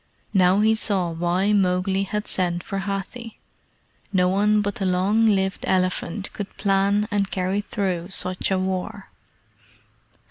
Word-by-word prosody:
Now 190 +1 +4
he 220 +1 +4
saw 190 -5 0
why 175 +5 +1
Mowgli 190 0 +1
had 210 +2 -3
sent 175 -2 -1
for 195 - -4
Hathi. 200 +4 -5 0.7
No 180 -2 +3
one 210 +2 +2
but 205 0 -2
the 195 - -2
long 195 +5 +2
lived 190 -2 +1
elephant 185 +1 -1
could 205 -2 -7
plan 200 +1 +2
and 200 -1 0
carry 190 +2 -1
through 185 -4 -3
such 185 -1 -1
a 190 - +1
war. 190 +2 -3
195 Hz, 140 wpm, -23 LUFS, 185-205 Hz, 0.7 s, Now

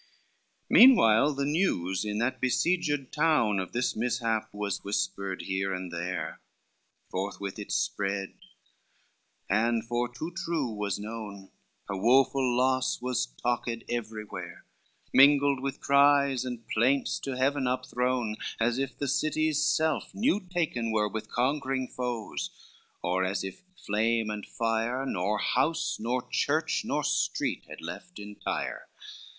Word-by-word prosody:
C - - -33 0.6
Meanwhile 145 - +7
the 140 0 -1
news 110 - 0
in 105 0 -2
that 120 +4 -1
besieged 145 +2 +1
town 150 -10 +3
Of 95 - -4
this 125 +1 0
mishap 115 -1 -1
was 105 -1 -3
whispered 100 - -2
here 95 0 -1
and 90 -1 -6
there, 90 +1 -4 0.7
Forthwith 100 +1 -4
it 105 - -7
spread, 100 - -1 1.1
and 115 +3 +1
for 120 +1 -1
too 155 +8 -5
true 165 -8 -1
was 105 -2 -2
known, 105 -2 -7 0.4
Her - - -3
woful 125 +4 +3
loss 130 0 +2
was 125 - -1
talked 120 - -2 0.2
everywhere, 110 -3 -5 0.5
Mingled 140 0 +6
with 135 0 -4
cries 140 -2 +4
and 120 -3 -6
plaints 130 +5 +2
to 135 -2 -4
heaven 135 0 +1
upthrown, 125 -3 -1 0.2
As 115 +2 +1
if 135 0 -3
the 140 - -2
city's 155 +2 +1
self 160 -2 +1
new 220 +1 +2
taken 165 - -2
were 105 -1 +1
With 110 +1 -5
conquering 130 0 0
foes, 125 -4 -4 0.5
or 90 +2 +1
as 95 0 -1
if 95 -1 -7 0.2
flame 110 +1 0
and 105 -1 -6
fire, 115 +3 -1
Nor 100 -3 0
house, 160 +9 0
nor 125 +3 -2
church, - - +1
nor - - -1
street - - 0
had - - -9
left - - -8
entire. 105 0 -4
120 Hz, 135 wpm, -28 LUFS, 105-140 Hz, 1.1 s, Meanwhile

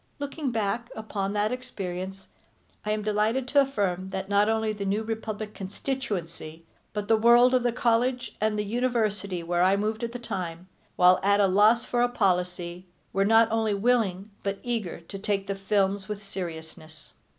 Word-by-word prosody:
Looking 285 0 -3
back 230 +1 -1
upon 205 -2 -3
that 210 +1 +1
experience 195 -6 -5 0.6
I 210 - -4
am 215 0 0
delighted 215 +5 +1
to 285 - +5
affirm 195 -9 -1
that 190 0 -4
not 205 +1 +3
only 220 -1 +1
The 205 -1 -5
New 200 +3 0
Republic 215 -1 -4
constituency 185 - -5 0.3
but 210 -1 -4
the 225 - +5
world 240 +3 +6
of 255 - +4
the 240 0 +1
college 245 +1 0
and 215 0 +1
the 210 - -1
university 215 -5 -1
where 175 +1 0
I 190 +2 +4
moved 215 +2 -2
at 230 - -2
that 245 -1 -7
time, 180 -4 -5 0.3
while 180 0 +6
at 200 +1 +3
loss 215 +4 +5
for 240 - 0
a 245 - +3
policy, 180 -4 -1 0.3
were 195 0 +2
not 225 +2 +6
only 220 -2 +1
willing 205 -3 +1
but 200 0 -2
eager 225 -9 -3
to 195 +4 -8
take 200 -1 -1
the 195 - -2
films 195 0 0
with 210 0 -5
seriousness. 160 -5 -8
210 Hz, 175 wpm, -27 LUFS, 190-230 Hz, 0.6 s, world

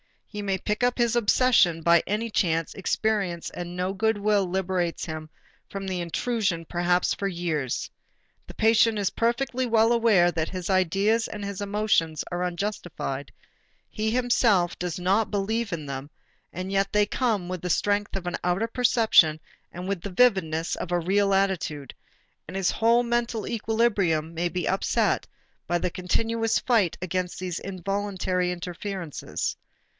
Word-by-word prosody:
He 210 - -7
may 195 -2 -1
pick 210 +4 -2
up 245 0 +2
his 240 -1 +2
obsession 230 -7 +4
by 170 0 +5
any 220 +3 -1
chance 165 -5 0
experience 195 -4 -1
and 175 0 -6
no 180 +1 -1
good 220 +2 +1
will 205 -2 +2
liberates 180 -2 -1
him 155 -1 -6 0.4
from 195 0 -5
the 185 -1 -2
intrusion 175 0 -1
perhaps 175 +1 +1
for 200 - -2
years. 165 -8 -2 0.6
The - - -9
patient 225 0 +3
is 200 -2 +1
perfectly 255 +2 0
well 225 -1 +3
aware 220 -7 +4
that 160 -2 -2
his 185 -1 -5
ideas 195 +5 +2
and 210 -1 -7
his 200 -1 -5
emotions 200 -6 +1
are 175 0 -1
unjustified, 175 -6 -4 0.6
he 215 0 -2
himself 225 -7 +2
does 175 -2 -3
not 195 +5 +1
believe 210 +1 -1
in 155 -3 -4
them, 140 0 -6 0.4
and 185 +2 -5
yet 195 0 0
they 210 0 +4
come 210 -5 -1
with 185 -2 -4
the 180 - -3
strength 205 +4 0
of 190 -2 -4
an 175 -1 -2
outer 180 +5 0
perception 225 -10 +4 0.3
and 180 +1 -7
with 195 -3 -2
the 200 - -5
vividness 180 -7 +2
of 180 - -5
a 175 - +2
real 195 +3 +2
attitude, 185 -7 -1 0.5
and - - -8
his 195 -2 +1
whole 235 +2 +3
mental 235 -2 -1
equilibrium 205 -8 0
may 170 +1 0
be 175 -1 -3
upset 190 - +1 0.4
by 175 - +1
the 175 +1 -2
continuous 225 +5 0
fight 220 -9 +1
against 185 0 -2
these 180 -2 -4
involuntary 190 -1 -2
interferences. 180 -1 -4
195 Hz, 155 wpm, -26 LUFS, 175-220 Hz, 0.6 s, by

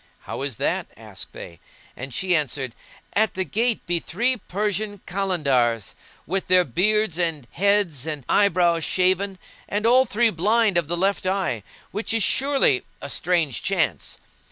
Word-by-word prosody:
"How - - -6
is 140 -3 -2
that?" - - -1
asked - - -9
they; 85 - -10 0.4
and 135 +2 -7
she 180 +7 +1
answered, 135 -4 -1 0.4
"At 220 0 +2
the 190 - 0
gate 230 +4 -1
be 175 -1 +1
three 250 +8 0
Persian 205 +1 -3
Kalandars[FN#167] 140 - 0 0.3
with 190 +3 -2
their 180 0 +5
beards 190 - +1
and 165 -6 -1
heads 195 -8 +1
and 150 -5 -4
eyebrows 175 -4 +3
shaven; 190 +2 +1 0.3
and 210 +2 -1
all 255 +3 +5
three 230 0 +2
blind 210 +2 +3
of 165 - -4
the 175 +2 -1
left 195 +1 0
eye—which 195 - -3
is 225 - +2
surely 270 - +3 0.2
a - - -7
strange 165 -5 0
chance. - - -1
185 Hz, 150 wpm, -23 LUFS, 155-210 Hz, 0.4 s, their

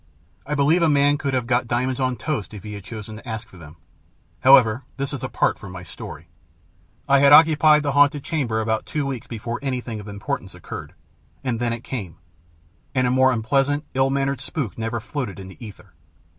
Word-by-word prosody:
I 150 - -1
believe 150 +5 +3
a 165 - +4
man 145 0 +3
could 140 -2 -1
have 125 -2 0
got 120 0 +1
diamonds 125 +2 -1
on 130 -1 +1
toast 130 -8 -4
if 100 - -9
he 105 -1 -7
had 100 -2 -8
chosen 110 +1 -8
to 120 +2 -10
ask 110 0 -5
for 90 - -16
them. 80 -2 -12 0.6
However, 130 -3 +6 0.2
this 140 +1 -3
is 135 - -5
apart - - 0
from 100 - -9
my 90 -1 -8
story. 80 - -10 0.8
I 140 0 +5
had 140 0 +6
occupied 155 0 +7
the 145 - 0
haunted 145 0 +4
chamber 120 -9 -1
about 110 0 -1
two 150 -2 -2
weeks 125 -3 -4
before 115 0 -5
anything 125 -5 -3
of 105 - -10
importance 100 -1 -5
occurred, - - -8 0.5
and 120 -3 -1
then 120 -1 0
it 115 0 -4
came 100 - -6 0.8
and 130 -1 +3
a 125 - +2
more 130 +1 +4
unpleasant, 135 +6 +1
ill 135 0 +2
mannered 135 -1 -1
spook 140 - -4
never 115 +1 -3
floated 120 - -5
in 95 -1 -9
the 95 - -13
ether. 105 -3 -12
125 Hz, 200 wpm, -23 LUFS, 110-140 Hz, 0.8 s, occupied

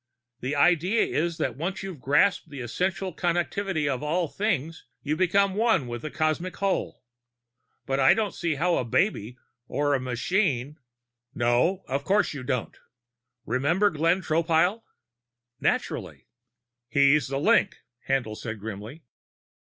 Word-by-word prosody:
The 130 +4 -3
idea 175 +8 +3
is 170 +1 -1
that 160 - -2
once 175 +8 -4
you've 190 -6 -7
grasped 155 +7 +2
the 140 -3 -7
Essential 180 +9 -2
Connectivity 175 -1 -1
of 130 -3 -1
All 165 +3 0
Things, 165 -4 -2 0.2
you 150 +1 0
become 190 +3 +2
One 220 - +2
with 120 -1 -5
the 155 - -5
Cosmic 155 +4 -1
Whole. 195 -8 -2 0.8
But 135 0 -1
I 130 - +6
don't 215 -4 -1
see 165 -3 -1
how 175 +4 +1
a - - 0
baby 120 - 0 0.3
or 145 +1 0
a 135 - +2
machine 135 - -1 0.3
" 120 0 -45
"No, 125 +11 +2
of 140 +2 -2
course 200 +1 +2
you 140 - -6
don't. 125 -2 -3 0.7
Remember 160 - +2
Glenn 165 +5 +1
Tropile?" 165 +6 +2 0.8
"Naturally." - - -2 0.6
"He's 140 +3 +4
the 135 +1 -2
link," 205 +4 +3 0.3
Haendl 125 -5 0
said 110 -1 -6
grimly. 110 +8 -8
155 Hz, 140 wpm, -26 LUFS, 130-185 Hz, 0.8 s, I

